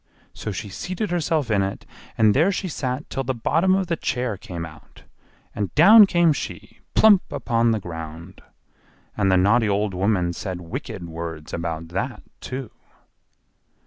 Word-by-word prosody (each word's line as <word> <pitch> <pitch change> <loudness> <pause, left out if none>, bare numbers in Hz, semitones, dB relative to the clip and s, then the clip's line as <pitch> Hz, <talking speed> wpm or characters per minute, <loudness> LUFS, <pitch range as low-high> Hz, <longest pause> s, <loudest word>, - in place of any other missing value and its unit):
So 105 - -5
she 100 +2 -5
seated 185 - -4
herself 160 -7 0
in 100 -2 +3
it, 95 0 -4 0.3
and 110 -2 +5
there 165 - +3
she 190 0 -3
sat 135 -3 -3
till 135 - -2
the 130 0 -2
bottom 165 +10 +2
of 190 -1 0
the 170 -1 -1
chair 125 -7 -2
came 85 -3 -7
out, 80 -2 -15 0.5
and 100 -2 -3
down 205 +6 +9
came 170 -4 +3
she, - - -7 0.2
plump 210 -4 +7
upon 115 -1 +1
the 110 -1 +1
ground. 80 0 -8 0.7
And 100 -2 +2
the 95 - +5
naughty 105 +4 +3
old 100 0 0
woman 90 -2 +1
said 95 0 -5
wicked 85 0 -6
words 80 -1 -7
about 85 -1 -4
that, 120 +9 -4 0.2
too. 130 -3 -6
110 Hz, 160 wpm, -23 LUFS, -, 0.7 s, down